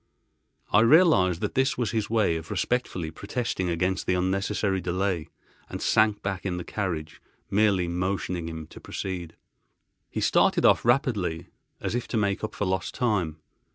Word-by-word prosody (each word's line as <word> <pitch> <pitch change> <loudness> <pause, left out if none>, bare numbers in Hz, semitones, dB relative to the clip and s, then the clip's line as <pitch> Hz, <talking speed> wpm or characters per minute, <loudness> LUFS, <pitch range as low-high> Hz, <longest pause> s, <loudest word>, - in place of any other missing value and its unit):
I - - +7
realised 115 - +5
that - - -2
this 130 +1 +1
was 120 -4 -1
his 110 -2 -1
way 110 -7 +2
of 80 0 -6
respectfully 90 -10 -1
protesting 100 0 -3
against 90 +3 -1
the 90 - +2
unnecessary 95 +1 0
delay, 90 -2 -1 0.4
and - - -5
sank 110 -1 +2
back 95 -1 -3
in 90 -2 -2
the 90 - -4
carriage, 85 -7 -4 0.3
merely 100 -3 +3
motioning 90 -1 -2
him 80 -1 -6
to - - -12
proceed. 90 -4 -5 0.7
He - - -4
started - - +3
off - - +5
rapidly, 115 -9 +1 0.3
as - - -3
if 120 0 -2
to 115 - -2
make 100 -1 0
up 110 - -4
for 105 - -1
lost 95 0 -2
time. 90 -10 0
95 Hz, 160 wpm, -26 LUFS, 90-110 Hz, 0.7 s, I